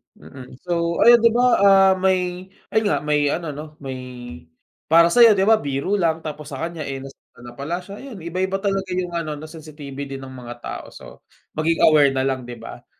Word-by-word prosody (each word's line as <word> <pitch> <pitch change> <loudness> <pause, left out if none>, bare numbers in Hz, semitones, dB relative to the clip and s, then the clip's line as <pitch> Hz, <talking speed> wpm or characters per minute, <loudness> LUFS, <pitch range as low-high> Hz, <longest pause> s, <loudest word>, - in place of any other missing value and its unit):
Mm, 130 -2 -13
so 170 -1 0
ayun 240 0 +8
di 230 - +5
ba, 240 +2 +2 0.2
ah, 195 -1 +6
may 185 -1 0 0.2
ayun 220 -1 +1
nga 175 - 0
may 150 -1 +1
ano 160 +1 -2
no 150 +1 -9
may 130 -1 -5 0.9
para 170 +1 +5
sayo 230 -1 +7
di 190 - +2
ba 220 +1 +4
biro 140 +6 -3
lang 165 -2 0
tapos 150 -1 -7
sa 145 - -7
kanya, 165 -3 -5
eh, 135 -1 -5
nasaktan 135 -3 -15
na 120 - -10
pala 155 +8 -5
siya 200 +3 -10
ayan 230 -11 -10
iba 170 +2 -5
iba 190 +1 0
talaga 195 0 -1
yung 180 -1 -2
ano 165 -3 -3
na 150 - -10
sensitive 155 -3 -10 0.2
din 135 0 -7
ng 130 - -9
mga 120 -2 -9
tao - - -6
so - - -13 0.3
maging 165 +1 0
aware 145 -3 +5
nalang 130 -2 -1
di 120 - -7
ba? 115 0 -11
165 Hz, 210 wpm, -21 LUFS, 140-190 Hz, 0.9 s, ayun